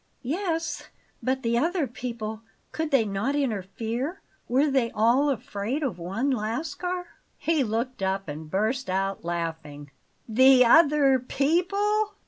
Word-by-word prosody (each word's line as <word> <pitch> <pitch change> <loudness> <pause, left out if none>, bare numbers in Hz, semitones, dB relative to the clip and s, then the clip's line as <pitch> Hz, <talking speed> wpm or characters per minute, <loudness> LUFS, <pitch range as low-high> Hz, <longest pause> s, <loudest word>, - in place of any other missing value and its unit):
"Yes, 330 +4 -2 0.3
but 260 +1 -1
the 235 0 +2
other 335 +2 +1
people, 230 -3 -6 0.3
could 320 -1 -2
they 270 -6 +3
not 205 +7 -1
interfere? 235 - -2 0.3
Were 260 +4 +3
they 265 -4 +1
all 240 +7 +3
afraid 245 +2 -3
of 230 -11 -2
one 205 +11 -1
Lascar?" 310 - -3 0.3
He 320 -3 +1
looked 235 +1 -3
up 195 0 -1
and 155 +1 -7
burst 215 +7 -1
out 195 0 -1
laughing. 160 -4 -5 0.4
"THE 255 +2 +6
OTHER 285 -1 +5
PEOPLE? 395 - 0
250 Hz, 125 wpm, -26 LUFS, 210-295 Hz, 0.4 s, THE